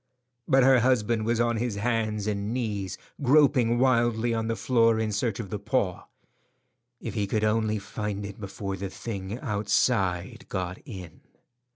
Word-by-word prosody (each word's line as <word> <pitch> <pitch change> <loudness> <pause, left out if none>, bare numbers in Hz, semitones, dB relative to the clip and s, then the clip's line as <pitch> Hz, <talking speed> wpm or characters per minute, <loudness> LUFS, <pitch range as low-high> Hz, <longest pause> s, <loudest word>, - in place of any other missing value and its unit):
But 135 0 +5
her 130 0 +6
husband 115 -3 +2
was 115 0 +1
on 120 -1 +2
his 115 -1 -1
hands 110 -1 -1
and 105 0 -2
knees 100 -7 -2 0.2
groping 130 -4 +4
wildly 120 -2 +2
on 110 -1 -1
the 115 - 0
floor 115 0 +3
in 110 -1 0
search 105 +1 -1
of 100 -5 -6
the 105 - -3
paw. 100 -4 -1 0.9
If - - -5
he 100 -1 -1
could 110 +2 0
only 110 0 +1
find 105 0 -4
it 100 +1 -8
before 100 -1 -5
the 100 +1 -4
thing 100 0 -5
outside 105 - 0
got 90 -2 -3
in. 90 -8 -9
110 Hz, 160 wpm, -27 LUFS, 100-120 Hz, 0.9 s, her